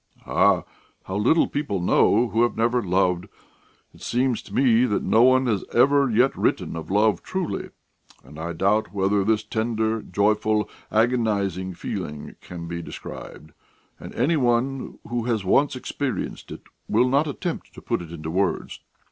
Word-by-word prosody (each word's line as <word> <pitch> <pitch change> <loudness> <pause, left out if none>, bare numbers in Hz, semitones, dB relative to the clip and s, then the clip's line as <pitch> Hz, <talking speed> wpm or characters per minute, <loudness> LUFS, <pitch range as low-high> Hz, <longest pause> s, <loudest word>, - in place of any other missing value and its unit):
"Ah, - - +3 0.4
how 95 - -6
little 125 +11 +3
people 140 -9 -2
know 110 +6 +3
who 115 - +1
have 120 - +1
never 120 +2 +2
loved! 90 -1 +1 0.7
It - - -18
seems 125 0 0
to - - -16
me 125 -2 +4
that 105 -5 -1
no 110 - +3
one 130 +1 +5
has 110 -5 0
ever 140 +2 +4
yet 120 +4 +3
written - - -1
of 80 - -7
love 105 +2 +2
truly, 185 -3 -4 0.5
and 75 +4 -13
I 85 +1 -4
doubt 100 +6 +1
whether 100 +1 +2
this 110 +1 +1
tender, 110 0 -1
joyful, 105 +2 +1 0.2
agonising 105 -6 0
feeling 75 -3 -6
can 85 -1 -8
be 85 0 -4
described, 75 -2 -9 0.5
and - - -9
any 150 +7 +2
one 130 +1 0
who 120 -1 -2
has 110 -5 -1
once 135 +9 +3
experienced 130 +1 -4
it - - -8 0.3
would 125 - +3
not 140 +4 +2
attempt 160 +4 -4
to - - -9
put - - -1
it 85 -2 -10
into 80 -1 -6
words. 95 +2 -1
110 Hz, 160 wpm, -24 LUFS, 95-125 Hz, 0.7 s, one